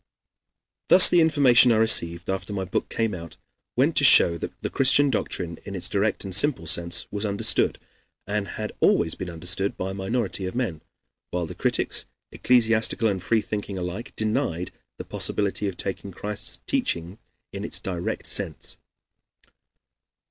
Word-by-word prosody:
Thus 185 Hz, -, +9 dB
the 175 Hz, -, +5 dB
information 135 Hz, -6 st, +5 dB
I -, -, +3 dB
received, 90 Hz, -6 st, +3 dB
after 95 Hz, +1 st, -4 dB
my 95 Hz, -1 st, -3 dB
book 95 Hz, -, -3 dB
came 115 Hz, -2 st, -2 dB
out, 85 Hz, -2 st, -9 dB, 0.4 s
went -, -, +2 dB
to -, -, +3 dB
show 85 Hz, -, +6 dB
that 85 Hz, -, -6 dB
the -, -, -2 dB
Christian 140 Hz, +1 st, +4 dB
doctrine, 85 Hz, -6 st, -3 dB
in 100 Hz, -, -8 dB
its 90 Hz, -, +1 dB
direct 105 Hz, +2 st, -1 dB
and 95 Hz, -2 st, -6 dB
simple 125 Hz, -, +3 dB
sense, 85 Hz, +2 st, +1 dB
was 105 Hz, 0 st, -4 dB
understood, 100 Hz, -2 st, +2 dB, 0.5 s
and 105 Hz, 0 st, -3 dB
had -, -, -6 dB
always 80 Hz, -1 st, +3 dB
been 95 Hz, -, -6 dB
understood, 90 Hz, +4 st, -2 dB
by 95 Hz, +1 st, -4 dB
a -, -, -6 dB
minority 95 Hz, -1 st, -3 dB
of 95 Hz, -, -7 dB
men, 110 Hz, -12 st, -3 dB, 0.5 s
while 90 Hz, -1 st, -3 dB
the -, -, -8 dB
critics, -, -, -1 dB, 0.3 s
ecclesiastical 115 Hz, -2 st, +2 dB
and 95 Hz, -2 st, -3 dB
freethinking 105 Hz, -1 st, -2 dB
alike, 90 Hz, +5 st, -6 dB
denied 90 Hz, -5 st, -2 dB, 0.3 s
the -, -, -8 dB
possibility 100 Hz, 0 st, -1 dB
of 95 Hz, -, -5 dB
taking 95 Hz, 0 st, -5 dB
Christ's 105 Hz, +3 st, -6 dB
teaching 85 Hz, +5 st, -2 dB, 0.3 s
in 100 Hz, 0 st, -6 dB
its -, -, -1 dB
direct 90 Hz, -3 st, -5 dB
sense. -, -, -5 dB
100 Hz, 155 wpm, -24 LUFS, 90-110 Hz, 0.5 s, Thus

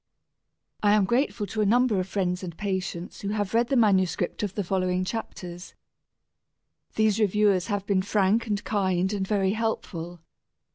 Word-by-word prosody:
I 205 Hz, -1 st, +4 dB
am 210 Hz, -2 st, +4 dB
grateful 235 Hz, 0 st, 0 dB
to 215 Hz, +2 st, -3 dB
a -, -, +3 dB
number 240 Hz, -2 st, +3 dB
of 185 Hz, -, -2 dB
friends 180 Hz, -2 st, -1 dB
and 170 Hz, -3 st, -7 dB
patients 185 Hz, -3 st, -4 dB
who 200 Hz, -, -4 dB
have 205 Hz, -1 st, -2 dB
read 235 Hz, +1 st, +3 dB
the 270 Hz, -, 0 dB
manuscript 190 Hz, -6 st, +2 dB
of 205 Hz, -2 st, -3 dB
the 205 Hz, -, -1 dB
following 185 Hz, 0 st, 0 dB
chapters. 180 Hz, -4 st, -6 dB, 1.2 s
These 220 Hz, -1 st, +2 dB
reviewers 205 Hz, -3 st, +2 dB
have 205 Hz, -3 st, -2 dB
been 195 Hz, -2 st, +2 dB
frank 205 Hz, +3 st, +1 dB
and 205 Hz, -1 st, -1 dB
kind 190 Hz, -2 st, 0 dB
and 195 Hz, -2 st, -2 dB
very 195 Hz, -2 st, +1 dB
helpful. 175 Hz, -6 st, -3 dB
200 Hz, 160 wpm, -26 LUFS, 185-215 Hz, 1.2 s, I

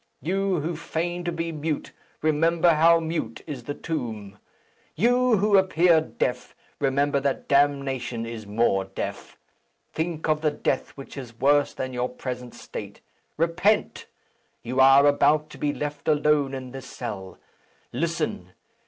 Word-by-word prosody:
You, 190 Hz, 0 st, 0 dB
who 165 Hz, +3 st, -3 dB
feign 170 Hz, +3 st, -3 dB
to 175 Hz, -, 0 dB
be 165 Hz, 0 st, -3 dB
mute, 155 Hz, -1 st, -3 dB, 0.3 s
remember 165 Hz, +2 st, +3 dB
how 165 Hz, +2 st, +5 dB
mute 160 Hz, -8 st, -3 dB
is 135 Hz, -7 st, -7 dB
the 145 Hz, -, -4 dB
tomb. 110 Hz, -10 st, -5 dB, 0.6 s
You, 245 Hz, +4 st, +3 dB
who 200 Hz, 0 st, +4 dB
appear 175 Hz, -3 st, +4 dB
deaf, 125 Hz, -5 st, -3 dB, 0.2 s
remember 140 Hz, +1 st, +1 dB
that 140 Hz, 0 st, -2 dB
damnation 135 Hz, -4 st, +1 dB
is 115 Hz, -2 st, -7 dB
more 100 Hz, -2 st, +1 dB
deaf. 95 Hz, -, -6 dB, 0.6 s
Think 160 Hz, -1 st, -2 dB
of 155 Hz, -1 st, +1 dB
the 155 Hz, -, +3 dB
death 140 Hz, -2 st, -1 dB
which 135 Hz, +1 st, -10 dB
is 120 Hz, -4 st, -9 dB
worse 145 Hz, +1 st, +3 dB
than 130 Hz, 0 st, -4 dB
your 125 Hz, 0 st, -1 dB
present 125 Hz, -1 st, -6 dB
state. -, -, -8 dB, 0.4 s
Repent! 170 Hz, +6 st, +1 dB, 0.6 s
You 125 Hz, +3 st, -2 dB
are 135 Hz, +2 st, +7 dB
about 150 Hz, +1 st, +3 dB
to -, -, -12 dB
be 145 Hz, -, +1 dB
left 145 Hz, -1 st, -5 dB
alone 150 Hz, -2 st, +2 dB
in 130 Hz, -1 st, -7 dB
this 135 Hz, 0 st, -8 dB
cell. 100 Hz, -6 st, -7 dB, 0.6 s
Listen! -, -, -2 dB
145 Hz, 145 wpm, -25 LUFS, 130-165 Hz, 0.6 s, are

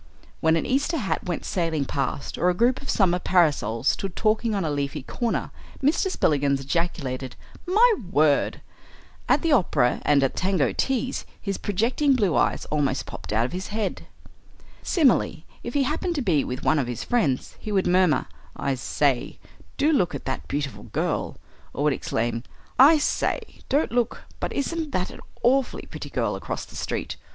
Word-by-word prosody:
When 160 Hz, 0 st, +3 dB
an 165 Hz, -, 0 dB
Easter 285 Hz, +6 st, +1 dB
hat 210 Hz, -9 st, -2 dB
went 175 Hz, -2 st, -3 dB
sailing 165 Hz, -5 st, -1 dB
past, 135 Hz, 0 st, -3 dB
or 180 Hz, -, +2 dB
a 180 Hz, -, +1 dB
group 240 Hz, +5 st, +2 dB
of 275 Hz, -, -8 dB
summer 180 Hz, -3 st, +3 dB
parasols 145 Hz, -, +2 dB
stood 195 Hz, -2 st, -2 dB
talking 220 Hz, 0 st, +1 dB
on 195 Hz, -4 st, -1 dB
a 155 Hz, -, -1 dB
leafy 140 Hz, 0 st, -2 dB
corner, 235 Hz, -, -2 dB, 0.3 s
Mr. 315 Hz, +7 st, +2 dB
Spillikins 140 Hz, -, +1 dB
ejaculated, 135 Hz, -4 st, -2 dB, 0.3 s
"My 450 Hz, +6 st, +5 dB, 0.2 s
word!" 150 Hz, -4 st, +2 dB, 0.7 s
At -, -, +3 dB
the 330 Hz, -, +2 dB
opera 150 Hz, -, +3 dB
and 145 Hz, -2 st, +4 dB
at 135 Hz, -, 0 dB
tango 185 Hz, -8 st, +1 dB
teas 265 Hz, -1 st, -1 dB, 0.2 s
his 200 Hz, -2 st, -3 dB
projecting 245 Hz, +8 st, +1 dB
blue 200 Hz, -9 st, +2 dB
eyes -, -, +1 dB
almost 140 Hz, -3 st, 0 dB
popped -, -, -8 dB
out 110 Hz, +2 st, +2 dB
of -, -, -4 dB
his 185 Hz, +2 st, -4 dB
head. 215 Hz, -1 st, -3 dB, 0.7 s
Similarly, 260 Hz, -, +2 dB, 0.2 s
if 240 Hz, -, -6 dB
he 280 Hz, -, +3 dB
happened 325 Hz, +5 st, -1 dB
to 285 Hz, -, -1 dB
be 160 Hz, -9 st, +2 dB
with 125 Hz, 0 st, -5 dB
one 155 Hz, -, +3 dB
of 130 Hz, -, -1 dB
his 120 Hz, -2 st, -4 dB
friends, 155 Hz, -, 0 dB
he 215 Hz, -, -6 dB
would 195 Hz, -2 st, +2 dB
murmur, 180 Hz, -5 st, +3 dB, 0.3 s
"I 140 Hz, -, -1 dB
say, 130 Hz, 0 st, 0 dB, 0.4 s
do 300 Hz, +3 st, +3 dB
look 180 Hz, -, +2 dB
at 140 Hz, -, -7 dB
that 130 Hz, -, -3 dB
beautiful 145 Hz, -1 st, -3 dB
girl," -, -, -2 dB, 0.4 s
or 145 Hz, -, -2 dB
would 150 Hz, -1 st, +3 dB
exclaim, 115 Hz, -2 st, -2 dB, 0.4 s
"I 295 Hz, +5 st, +8 dB
say, 295 Hz, -, -1 dB
don't 285 Hz, +3 st, +2 dB
look, 240 Hz, -1 st, 0 dB, 0.2 s
but -, -, -2 dB
isn't 310 Hz, +1 st, -2 dB
that 185 Hz, 0 st, -1 dB
an -, -, -11 dB, 0.2 s
awfully 260 Hz, +2 st, +2 dB
pretty -, -, -8 dB
girl -, -, -1 dB
across -, -, -5 dB
the -, -, -15 dB
street?" -, -, -3 dB
180 Hz, 175 wpm, -25 LUFS, -, 0.7 s, I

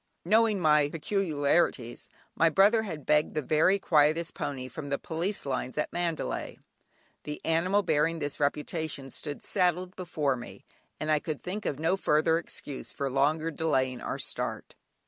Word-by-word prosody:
Knowing 215 Hz, +1 st, +4 dB
my 150 Hz, -3 st, +4 dB
peculiarities, 155 Hz, -, 0 dB, 0.2 s
my 165 Hz, -, +4 dB
brother 200 Hz, +7 st, +5 dB
had 160 Hz, -9 st, -6 dB
begged 150 Hz, +1 st, +2 dB
the 155 Hz, -, +1 dB
very 155 Hz, +8 st, +3 dB
quietest 160 Hz, -1 st, +2 dB
pony 135 Hz, -3 st, -4 dB
from 140 Hz, +3 st, -7 dB
the 140 Hz, -, 0 dB
police 170 Hz, +6 st, -3 dB
lines 130 Hz, -1 st, -3 dB
at 150 Hz, -, -1 dB
Mandalay, 170 Hz, -2 st, -2 dB, 0.6 s
the 150 Hz, 0 st, -6 dB
animal 180 Hz, +5 st, +2 dB
bearing 160 Hz, 0 st, +2 dB
this 145 Hz, -3 st, -4 dB
reputation 145 Hz, -1 st, -2 dB
stood 145 Hz, +2 st, -6 dB
saddled 180 Hz, -1 st, +1 dB
before 155 Hz, -7 st, -1 dB
me, 120 Hz, -1 st, -10 dB, 0.3 s
and 155 Hz, 0 st, -1 dB
I 155 Hz, -, +4 dB
could 155 Hz, -1 st, -5 dB
think 205 Hz, +4 st, -4 dB
of 140 Hz, -, -2 dB
no 165 Hz, +4 st, +2 dB
further 160 Hz, -1 st, +3 dB
excuse 145 Hz, -4 st, -7 dB
for 140 Hz, -1 st, -3 dB
longer 155 Hz, +4 st, +1 dB
delaying 130 Hz, -6 st, 0 dB
our -, -, -3 dB
start. -, -, -4 dB
155 Hz, 155 wpm, -29 LUFS, 145-175 Hz, 0.6 s, brother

